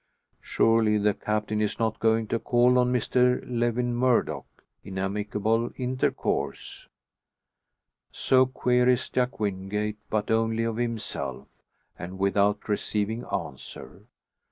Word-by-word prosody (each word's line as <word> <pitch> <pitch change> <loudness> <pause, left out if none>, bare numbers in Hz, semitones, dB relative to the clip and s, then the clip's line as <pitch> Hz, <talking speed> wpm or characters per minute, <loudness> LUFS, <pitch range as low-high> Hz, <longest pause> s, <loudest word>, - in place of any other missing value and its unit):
Surely 115 -2 +2
the 105 0 +2
Captain 105 +1 -2
is 105 - -1
not 110 -1 -1
going 110 0 +2
to 115 +2 -1
call 125 +2 +3
on 125 0 +2
Mr 125 +1 +2
Lewin 120 0 0
Murdock 125 0 0 0.2
in 95 -1 -8
amicable 105 +4 -1
intercourse? 130 0 -2 1.2
So 130 0 +3
queries 125 0 +1
Jack 125 -1 -1
Wingate, 105 +1 -2
but 105 0 -1
only 115 0 +1
of 115 -1 -2
himself, 115 -2 -4 0.5
and 90 +2 -7
without 100 +1 +1
receiving 105 +2 -1
answer. 75 -6 -7
110 Hz, 110 wpm, -26 LUFS, 105-125 Hz, 1.2 s, call